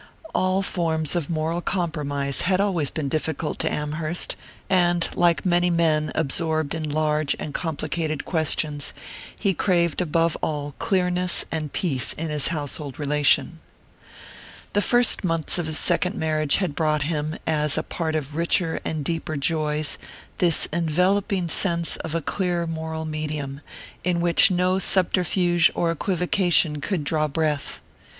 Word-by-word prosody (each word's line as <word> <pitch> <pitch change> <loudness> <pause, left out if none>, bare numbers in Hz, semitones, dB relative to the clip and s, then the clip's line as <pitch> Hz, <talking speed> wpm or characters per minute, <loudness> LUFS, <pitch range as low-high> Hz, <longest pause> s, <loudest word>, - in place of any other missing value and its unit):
All 185 +1 +1
forms 160 -4 0
of 170 -5 -2
moral 165 +1 -1
compromise 145 -6 -1
had 185 0 +2
always 180 -8 +1
been 155 -3 -3
difficult 155 +1 -2
to - - 0
Amherst, 155 +3 -2 0.3
and 175 -2 +2
like 175 0 +2
many 175 0 +3
men 160 -3 +1
absorbed 160 0 -1
in 160 -2 -3
large 150 0 +1
and 145 - -6
complicated 160 -2 -3
questions 155 -3 0 0.4
he 200 -2 +1
craved 170 -3 +1
above 165 -1 +1
all 145 -2 -2
clearness 180 -2 +1
and 155 -3 -3
peace 140 -9 0
in 160 0 -4
his 150 -2 +1
household 145 -3 -4
relation. 150 -1 +2 1.1
The 205 - +3
first 240 +1 +4
months 165 -1 -1
of 170 - -2
his 155 0 -2
second 180 +2 +1
marriage 155 -5 +1
had 185 -6 -1
brought 155 -1 +1
him, 155 0 -2
as 150 -2 +1
a 155 - 0
part 160 -2 -3
of 150 -1 -3
richer 170 0 +1
and 155 -3 -3
deeper 165 -1 -2
joys, 150 0 0 0.4
this 170 -3 +3
enveloping 180 +3 +1
sense 170 0 +3
of 160 0 -5
a 165 - -1
clear 175 -1 -1
moral 160 -1 -4
medium, 150 -3 -4 0.4
in 175 -1 +1
which 170 -1 +6
no 185 +1 +1
subterfuge 180 -2 +3
or 170 -1 +1
equivocation 175 -3 +1
could 180 -1 -2
draw 155 +1 +1
breath. 150 -1 -2
160 Hz, 145 wpm, -24 LUFS, 150-175 Hz, 1.1 s, which